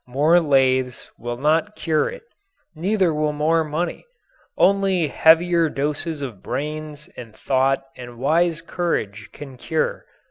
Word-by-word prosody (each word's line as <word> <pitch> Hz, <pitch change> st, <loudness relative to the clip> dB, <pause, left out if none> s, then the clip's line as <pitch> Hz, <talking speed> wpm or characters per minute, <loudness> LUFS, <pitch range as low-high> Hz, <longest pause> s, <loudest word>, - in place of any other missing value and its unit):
More 150 Hz, +7 st, +3 dB
lathes 130 Hz, -5 st, +1 dB
will 120 Hz, +1 st, -5 dB
not 160 Hz, +10 st, +1 dB
cure 160 Hz, -2 st, 0 dB
it; -, -, -10 dB, 0.5 s
neither 185 Hz, +1 st, +1 dB
will 150 Hz, 0 st, 0 dB
more 160 Hz, +2 st, +1 dB
money. 155 Hz, +3 st, -3 dB, 0.5 s
Only 195 Hz, -5 st, +2 dB
heavier 165 Hz, +2 st, +4 dB
doses 150 Hz, +2 st, -3 dB
of 120 Hz, -8 st, -7 dB
brains 150 Hz, +1 st, -5 dB
and 115 Hz, -3 st, -11 dB
thought 135 Hz, +2 st, +1 dB
and 120 Hz, -1 st, -10 dB
wise 165 Hz, +5 st, +1 dB
courage 110 Hz, -, -3 dB
can 135 Hz, -3 st, -11 dB
cure. 160 Hz, +5 st, -2 dB
150 Hz, 130 wpm, -22 LUFS, 135-165 Hz, 0.5 s, heavier